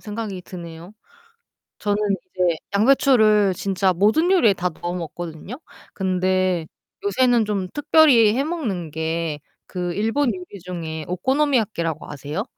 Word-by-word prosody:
생각이 210 -3 -6
드네요. 170 0 -10 0.9
저는 205 -1 0
이제 185 -3 -1 0.2
양배추를 215 -4 +4
진짜 190 0 0
모든 215 - +2
요리에 245 - +4
다 180 0 -1
넣어 175 +2 -5
먹거든요. 175 - -7 0.3
근데 185 -2 0 0.4
요새는 255 - +3
좀 200 -3 -2
특별히 280 -8 +5
해 270 - +1
먹는 225 - -3
게 160 0 -3 0.3
그 180 -2 -4
일본 225 +6 +1
요리 185 +2 -10
중에 165 -3 -6
오코노미야키라고 215 - 0
아세요? 145 +7 -4
190 Hz, 280 characters per minute, -22 LUFS, 175-225 Hz, 0.9 s, 특별히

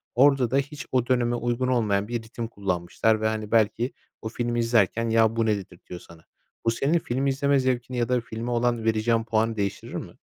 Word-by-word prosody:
Orada 130 -2 +4
da 135 - +3
hiç 145 +2 -3
o 125 -2 +1
döneme 120 -2 +1
uygun 120 +2 -1
olmayan 105 -5 +1
bir 120 -1 -3
ritim 115 +1 -6
kullanmışlar 100 +1 0
ve, 110 - +2
hani, 110 -1 -3
belki 115 +2 +2 0.3
o 110 - -4
filmi 120 +1 -2
izlerken 115 -1 +2
"Ya, 115 0 +3
bu 115 -1 +1
ne?" 110 -1 +2
dedirtiyor 90 -2 -10
sana. 80 -1 -16 0.4
Bu 115 - +4
senin 145 +8 +1
film 135 -1 -2
izleme 140 +1 +2
zevkini 125 -1 -1
ya 120 0 0
da 125 -1 +2
filme 115 +1 -5
olan 120 -1 0
vereceğin 115 +1 +2
puanı 110 0 0
değiştirir 100 -1 -3
mi? - - -6
115 Hz, 200 wpm, -25 LUFS, 110-125 Hz, 0.4 s, Orada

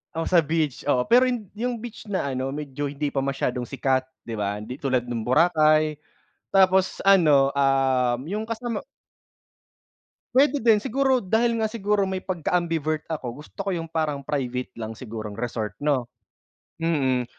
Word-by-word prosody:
Oh, 165 - -1
sa 175 - +6
beach, 155 -3 -1
oo. 125 -3 +3
Pero 250 +2 +6
'yung 230 -6 -3
'yung 240 +4 -2
beach 230 -2 -9
na 185 -9 -1
ano 130 +1 -2
medyo 145 -1 -4
hindi 145 +1 -3
pa 135 - -1
masyadong 125 -2 -2
sikat 130 -1 0 0.2
'di 115 - -6
ba, 100 0 -1
hindi 125 +6 -7
tulad 130 -3 0
nung 120 -2 -4
Boracay. 155 +1 +3 0.5
Tapos 190 -1 +3
ano, 150 -8 +5
um, 135 -3 +2
'yung 210 +4 -2
kasama 230 -1 -3 1.5
Puwede 290 +2 +4
din, 225 -3 +4
siguro 265 0 +1
dahil 230 +5 +2
nga 215 - -1
siguro 210 -2 +1
may 190 -1 -2
pagka-ambivert 165 -4 -1
ako 140 -5 -5
gusto 150 - -15
ko 195 - -2
'yung 165 -2 -3
parang 155 -3 -1
private 125 -3 -2
lang 110 -1 -5
sigurong 110 -3 -7
resort 115 -3 -3
'no, 135 -5 0 0.7
mm. 135 -7 +1
150 Hz, 155 wpm, -24 LUFS, 130-190 Hz, 1.5 s, sa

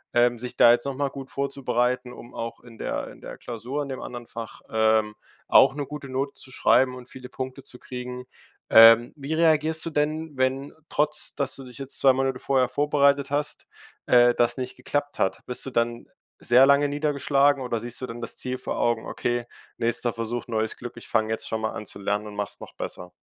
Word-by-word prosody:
ähm, 120 0 +3
sich 125 +1 -6
da 120 - +8
jetzt 120 +2 +2
noch 135 -1 -3
mal 140 0 -1
gut 135 0 -9
vorzubereiten, 125 -2 -1
um 120 0 -12
auch 115 0 -5
in 115 -2 -15
der - - -3
in - - -14
der - - -9
Klausur 125 +5 -4
in 140 - -8
dem 130 - -5
anderen 120 -1 -7
Fach, 115 -1 -8
ähm, 110 -1 +2 0.3
auch 135 0 +6
'ne 145 -1 -3
gute 140 -1 -8
Note 135 +2 -2
zu 130 - -12
schreiben 130 0 +3
und 125 0 -11
viele 125 -1 -11
Punkte 130 +1 -6
zu 125 - -11
kriegen. 125 0 -7 0.4
Ähm, 115 +1 +8
wie 145 +1 -5
reagierst 160 0 +2
du 165 - -3
denn, 155 0 -1
wenn, 130 +2 -1 0.2
trotz, 150 0 0
dass 140 -2 -2
du 135 - -9
dich 125 -2 -12
jetzt 135 0 -5
2 135 - +6
Monate 135 0 0
vorher 130 -1 +2
vorbereitet 140 0 +2
hast, 145 +1 -2 0.4
äh, 120 0 +6
das 120 +1 +1
nicht 130 0 -4
geklappt 145 0 -3
hat? 95 0 +1
Bist 125 - -5
du 135 - -4
dann 115 -1 -1 0.3
sehr 125 +2 +6
lange 140 +1 +4
niedergeschlagen 145 -1 +2
oder 120 -2 -2
siehst 120 +2 -8
du 130 - -3
dann 115 +1 -7
das 115 - -5
Ziel 130 0 -3
vor - - -4
Augen: 120 -1 +1
„Okay, 120 0 -2 0.3
nächster 120 +1 +1
Versuch, 115 +1 -4
neues 110 -1 -1
Glück, 120 -1 -7
ich - - -10
fange 110 0 +1
jetzt 110 - -3
schon 110 -1 -2
mal 110 - -1
an 105 - -7
zu - - -10
lernen 105 +1 -1
und 105 - -9
mach's 105 -1 -4
noch - - -11
besser?“ 90 0 -7
125 Hz, 215 wpm, -25 LUFS, 120-140 Hz, 0.4 s, da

